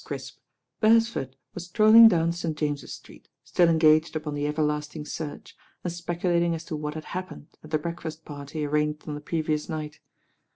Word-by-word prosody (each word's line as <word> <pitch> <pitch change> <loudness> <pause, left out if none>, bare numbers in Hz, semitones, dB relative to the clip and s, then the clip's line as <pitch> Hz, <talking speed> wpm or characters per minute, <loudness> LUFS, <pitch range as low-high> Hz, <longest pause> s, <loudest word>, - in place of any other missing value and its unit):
Critp, - - -7 0.4
Beresford 225 - +2 0.2
was 175 - -6
strolling 220 +4 +8
down 170 -5 +3
St. 170 -2 -4
James's 145 -2 -2
Street, - - -16
still 175 -2 +3
engaged 160 0 +4
upon 150 -1 -3
the 145 0 -1
everlasting 150 0 -2
search, 150 -1 -7 0.3
and 175 - -3
speculating 175 0 0
as 165 0 -8
to 165 - -4
what 150 0 -4
had 155 - -6
happened 185 -4 -7
at 155 - -12
the 155 - +1
breakfast 160 0 -6
partv 145 +1 -5
arranged 150 +1 -1
on 150 - -3
the 145 - -6
previous 155 -1 -2
night. 150 -1 -5
155 Hz, 170 wpm, -26 LUFS, 150-170 Hz, 0.4 s, strolling